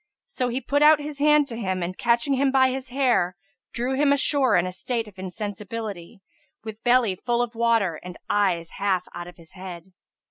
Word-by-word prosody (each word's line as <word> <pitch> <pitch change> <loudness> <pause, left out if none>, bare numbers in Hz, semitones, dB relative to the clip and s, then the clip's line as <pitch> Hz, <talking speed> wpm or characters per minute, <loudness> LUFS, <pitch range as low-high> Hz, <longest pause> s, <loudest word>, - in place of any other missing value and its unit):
So 255 - -3
he 245 +2 -2
put 285 +3 0
out 305 0 +7
his 295 -1 -6
hand 300 0 +4
to 230 - -6
him 190 -5 -2
and, 180 +2 -4
catching 235 +5 +1
him 270 0 +2
by 260 -1 +4
his 260 0 -5
hair, 245 -9 +1 0.4
drew 245 +3 -2
him 280 +1 +3
ashore 280 -4 +2
in 175 - +2
a 185 - -3
state 225 +5 -3
of 195 -3 -14
insensibility, 205 0 -6 0.4
with 220 -1 -9
belly 245 -4 +3
full 240 +4 0
of 240 -1 -5
water 225 -8 +1
and 180 -1 -9
eyes 180 -5 0
half 190 -2 +1
out 175 - -7
of 175 - -13
his 165 -2 -16
head. 185 -1 -10
230 Hz, 200 wpm, -24 LUFS, 185-260 Hz, 0.4 s, out